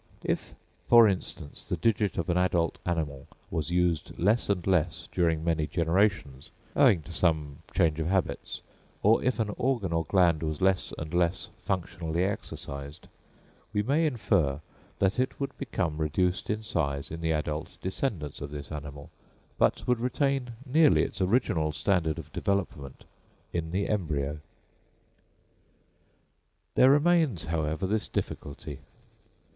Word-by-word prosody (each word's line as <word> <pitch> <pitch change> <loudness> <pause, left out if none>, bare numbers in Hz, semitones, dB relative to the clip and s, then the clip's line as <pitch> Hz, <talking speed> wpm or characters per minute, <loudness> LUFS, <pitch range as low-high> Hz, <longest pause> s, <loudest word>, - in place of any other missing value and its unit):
If, - - -2 0.3
for 120 -2 +8
instance, 90 -6 -3
the 90 - -3
digit 105 +2 +1
of 85 - -1
an 85 - +1
adult 90 -2 +1
animal 75 -6 -2 0.2
was 80 0 -1
used 90 -2 0
less 105 +6 +2
and 90 -4 0
less 90 -3 +1
during 80 -3 +1
many 80 -2 +1
generations, 85 -5 0 0.3
owing 85 -5 +5
to 80 - -10
some 80 -4 0 0.2
change 80 -1 +3
of 80 - -1
habits, 95 0 -1 0.4
or 110 +3 +5
if 125 -1 +1
an 105 -2 0
organ 120 -9 0
or 85 0 +1
gland 85 -3 +3
was 80 -2 -2
less 95 -1 +2
and 80 +2 -6
less 85 0 0
functionally 85 -2 -2
exercised, 70 -7 -5 0.6
we 105 -1 +1
may 150 +8 +2
infer 85 - +1 0.4
that 95 +4 +1
it 130 - 0
would 140 - -3
become 90 - -2
reduced 90 +4 0
in 110 +1 -1
size 70 -9 -2
in 80 +1 -5
the 80 0 0
adult 75 0 -2
descendants 95 - -3
of 70 - -4
this 75 0 -7
animal, 75 -1 -7 0.5
but - - +2
would 125 -2 +2
retain 130 0 0
nearly 150 +3 +5
its - - -4
original 90 -6 +2
standard 80 -1 +1
of - - -9
development 80 -9 -2 0.5
in 80 -2 -2
the 95 +4 -1
embryo. 75 -7 -1 2.3
There 130 - +6
remains, 145 - +3
however, 80 +2 -1
this 105 +3 0
difficulty. 70 0 -5
85 Hz, 140 wpm, -28 LUFS, 80-105 Hz, 2.3 s, for